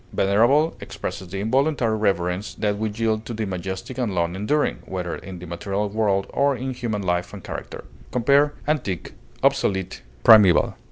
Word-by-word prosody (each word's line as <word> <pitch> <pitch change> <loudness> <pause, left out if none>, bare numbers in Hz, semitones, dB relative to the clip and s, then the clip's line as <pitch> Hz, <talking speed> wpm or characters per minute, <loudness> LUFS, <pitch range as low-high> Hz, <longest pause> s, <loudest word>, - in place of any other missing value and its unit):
Venerable 120 +11 +3
expresses 95 - -6
the 95 +3 -5
involuntary 130 0 +1
reverence 95 -2 -1
that 105 -1 -1
we 110 0 0
yield 110 0 -1
to 115 - -6
the 110 0 -2
majestic 95 +6 -5
and 110 -7 -1
long 85 0 0
enduring, 145 +10 0
whether 90 -2 -3
in 95 -1 -9
the 90 - -9
material 100 +4 -3
world 100 -2 +1
or 140 0 +2
in 130 +1 -4
human 115 -5 -3
life 90 -1 -1
and - - -9
character. - - -7 0.3
Compare 140 +4 +3
ANTIQUE; 125 - -2 0.3
OBSOLETE; 95 -7 +1 0.2
PRIMEVAL. 105 -5 +7
105 Hz, 160 wpm, -23 LUFS, 95-120 Hz, 0.3 s, PRIMEVAL